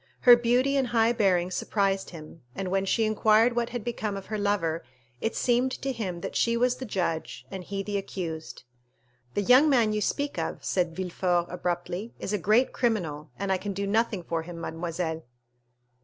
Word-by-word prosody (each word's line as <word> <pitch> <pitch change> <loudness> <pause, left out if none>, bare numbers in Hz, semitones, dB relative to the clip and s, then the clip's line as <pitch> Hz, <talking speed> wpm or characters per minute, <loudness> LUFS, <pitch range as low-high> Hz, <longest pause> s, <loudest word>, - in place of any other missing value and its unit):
Her 245 -1 +9
beauty 245 +4 +2
and 265 -2 +1
high 230 -1 +3
bearing 185 -5 +2
surprised 195 0 0
him, 160 -1 -11
and 195 -1 -3
when 195 0 +1
she 225 +4 +2
inquired 220 +2 +4
what 235 -1 0
had 240 -2 -5
become 215 -4 -3
of 195 - -8
her 215 - -3
lover, 195 -6 0 0.4
it 225 - -2
seemed 250 +1 +2
to 270 - -3
him 190 -8 -4
that - - -5
she 230 0 +2
was 250 +1 +2
the 260 - -6
judge, 170 -5 -2
and 190 -1 -5
he 195 +2 -4
the 205 0 -2
accused. 170 -5 -6 0.7
"The 205 - +1
young 255 +8 +6
man 235 -6 +3
you 210 - -1
speak 285 +7 -1
of," - - -4
said 175 -3 0
Villefort 180 -1 0
abruptly, 180 +4 -3
"is 205 - -4
a 210 - +1
great 215 +8 +3
criminal, 165 - -1
and 200 -1 -2
I 190 - +1
can 205 +1 -4
do 200 +1 -2
nothing 210 -2 0
for 165 -1 -2
him, 170 +1 -8
mademoiselle." 165 0 -3
200 Hz, 190 wpm, -27 LUFS, 175-235 Hz, 0.7 s, Her